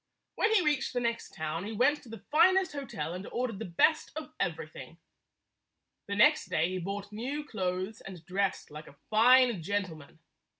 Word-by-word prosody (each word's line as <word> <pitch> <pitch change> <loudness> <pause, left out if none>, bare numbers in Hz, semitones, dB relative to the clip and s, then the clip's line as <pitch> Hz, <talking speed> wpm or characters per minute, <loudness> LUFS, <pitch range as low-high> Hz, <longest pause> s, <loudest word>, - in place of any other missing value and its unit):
When 435 - +1
he 425 -5 +4
reached 295 -3 +1
the 245 - 0
next 235 -1 -3
town 160 +2 -3
he 215 +2 -5
went 290 +7 +2
to 240 - -15
the 225 -2 -10
finest 370 +3 +4
hotel 200 - -5
and 185 +2 -6
ordered 240 -5 -2
the - - -4
best 245 - +2
of 310 0 -7
every 160 -2 -2
thing. 155 +1 -11 1.1
The 200 - -3
next 300 +9 +4
day 160 +3 +1
he 185 0 -3
bought 200 +3 -5
new 260 +8 -4
clothes 185 -3 -3
and 180 -4 -10
dressed 195 -1 -2
like 150 +1 -9
a - - -15 0.2
fine 240 -2 +5
gentleman. 165 -5 -4
205 Hz, 180 wpm, -30 LUFS, 175-260 Hz, 1.1 s, fine